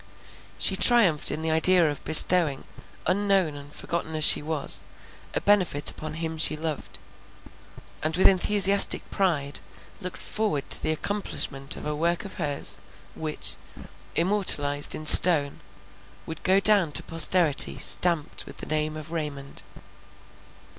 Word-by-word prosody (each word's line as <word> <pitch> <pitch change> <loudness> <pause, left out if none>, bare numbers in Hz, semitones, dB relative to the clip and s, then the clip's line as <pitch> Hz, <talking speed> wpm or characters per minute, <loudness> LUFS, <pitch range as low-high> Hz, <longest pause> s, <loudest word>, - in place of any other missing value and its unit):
She - - 0
triumphed 205 -11 +3
in 155 +2 -7
the 160 - -3
idea 170 +2 +3
of 145 -1 -7
bestowing, 160 -2 +5 0.4
unknown 195 -3 -1
and 145 0 -14
forgotten 160 +1 -7
as 155 - -2
she - - +5
was, 150 -1 -2 0.5
a - - -3
benefit 180 -8 0
upon 155 0 -10
him 160 -1 -7
she 155 -1 +1
loved; 155 -2 -8 1.0
and 155 +1 -4
with 190 - -1
enthusiastic 200 +1 +2
pride 150 -7 -3 0.4
looked 180 0 -10
forward 210 -10 -4
to - - +5
the - - -3
accomplishment 155 -6 -5
of - - -12
a 150 0 -5
work 170 +5 -4
of 195 - -12
hers, 145 -3 -1 0.3
which, 155 -1 -5 0.6
immortalized 160 -6 +2
in 155 - -10
stone, 150 -3 +7 0.7
would 160 -1 -10
go 190 +1 0
down 200 -6 +2
to - - -1
posterity 165 -1 +2
stamped 170 -4 -3
with - - -14
the - - -9
name 155 0 -5
of 155 +1 -12
Raymond. 145 -4 -8
160 Hz, 140 wpm, -23 LUFS, 150-185 Hz, 1.0 s, stone